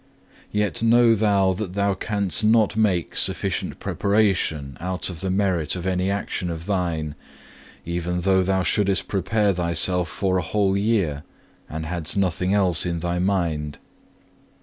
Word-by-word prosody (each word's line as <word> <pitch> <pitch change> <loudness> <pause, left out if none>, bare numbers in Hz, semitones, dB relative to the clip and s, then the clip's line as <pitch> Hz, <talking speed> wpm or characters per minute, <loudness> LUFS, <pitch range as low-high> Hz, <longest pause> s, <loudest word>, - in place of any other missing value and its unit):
2. - - -4
Yet 105 -2 0
know 115 0 +5
thou 100 -3 +2
that 95 -1 -5
thou 100 0 +1
canst 100 0 -1
not 110 -1 +3
make 100 -6 0
sufficient - - -1
preparation 95 -9 0
out 90 +1 -2
of 85 - -8
the 95 +1 -3
merit 95 -5 0
of 90 -1 -5
any 95 0 0
action 100 -2 -2
of 85 0 -6
thine, 85 -6 -2 0.7
even 85 +1 -2
though 95 +1 +3
thou 95 0 +1
shouldest 100 +2 +1
prepare 100 +1 +1
thyself 85 0 +1
for 95 -1 0
a - - 0
whole 100 +2 0
year, 100 -8 0 0.5
and 80 +1 -5
hadst 85 +1 -4
nothing 95 -1 0
else 95 -5 +2
in 85 -1 -2
thy 85 +1 -2
mind. 85 -6 -1
95 Hz, 150 wpm, -23 LUFS, 85-100 Hz, 0.7 s, know